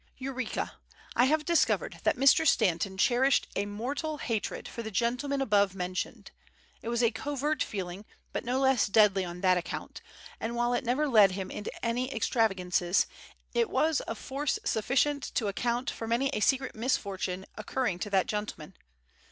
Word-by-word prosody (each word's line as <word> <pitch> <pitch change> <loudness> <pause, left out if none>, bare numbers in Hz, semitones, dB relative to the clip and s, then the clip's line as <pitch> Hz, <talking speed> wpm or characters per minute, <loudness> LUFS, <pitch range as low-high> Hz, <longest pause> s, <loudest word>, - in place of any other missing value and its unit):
Eureka! 260 -3 -4 0.4
I 245 - +5
have 300 +2 +2
discovered 340 0 +1
that - - +3
Mr. 275 +4 +5
Stanton 190 -3 +2
cherished 255 +4 +3
a 200 - -1
mortal 275 +9 -3
hatred 225 -6 -3
for 235 - -6
the 220 - -5
gentleman 250 +6 0
above 200 -5 +2
mentioned. 185 0 -4 0.5
It 230 - -5
was 235 0 +1
a 230 - +4
covert 290 +5 -2
feeling, 190 0 -4 0.3
but - - -2
no 250 +2 0
less 265 -4 +3
deadly 200 -2 +4
on 175 0 -7
that 185 -2 +4
account; 170 - -7 0.4
and 230 +1 -3
while 240 +1 +1
it 245 - 0
never 265 +5 +1
led 210 -7 +6
him 190 0 -4
into 210 - -5 0.2
any 250 +3 -1
extravagances, 190 -6 +1 0.5
it 465 -3 +2
was 315 -2 +2
of 225 - -4
force 275 +4 -2
sufficient 275 +6 +1
to 225 - +1
account 240 +5 -1
for 225 - -6
many 240 +4 +1
a - - -2
secret 265 +4 +1
misfortune 195 -5 -2
occurring 215 -3 -2
to 205 - -3
that 190 -2 +2
gentleman. 210 -6 -5
230 Hz, 165 wpm, -29 LUFS, 200-265 Hz, 0.5 s, led